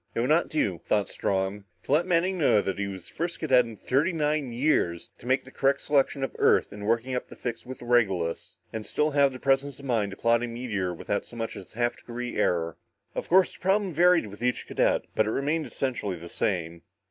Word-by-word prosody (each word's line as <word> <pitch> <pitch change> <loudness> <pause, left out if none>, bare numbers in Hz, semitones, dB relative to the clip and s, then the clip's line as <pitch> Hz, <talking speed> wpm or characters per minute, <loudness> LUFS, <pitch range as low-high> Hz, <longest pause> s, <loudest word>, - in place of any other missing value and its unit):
It - - 0
would 120 - +1
not 160 +3 +3
do, 100 - 0
thought 105 -3 +1
Strong, 95 +1 -2 0.2
to - - -7
let 160 +5 +3
Manning 180 +1 +1
know 140 -8 +4
that 95 -1 -2
he 100 - -1
was 95 -3 -8
the - - -16
first 170 +1 -3
cadet 130 -6 +4
in 115 -1 -8
thirty 140 - +1
nine 150 -4 0
years 115 - 0
to - - -11
make 130 +1 +2
the 130 - -14
correct 140 +1 +2
selection 140 -1 +1
of 135 - -3
Earth - - +3
in 105 0 -7
working 115 +4 +1
up 125 - -2
the - - -12
fix 120 -1 -5
with 130 -1 -8
Regulus, 95 -9 +1 0.2
and 110 -1 -4
still 150 +7 0
have 140 -1 +4
the 130 - -7
presence 135 0 +1
of 140 - -11
mind 115 -6 +1
to 95 - -9
plot 115 0 +3
a 120 - -2
meteor 115 -6 -3
without 95 +4 -2
so - - -13
much 115 -1 -4
as 95 - -11
a - - -15
half 120 0 0
degree 120 0 -6
error. 85 -2 0 0.4
Of - - -5
course 185 +1 +5
the - - -16
problem 195 -1 +1
varied 175 -2 +5
with 105 +1 -11
each 125 -1 0
cadet, - - +1
but 110 - +2
it - - 0
remained 150 +6 0
essentially 120 -8 -2
the 85 +1 -10
same. 85 -5 -2
120 Hz, 235 wpm, -27 LUFS, 105-145 Hz, 0.4 s, course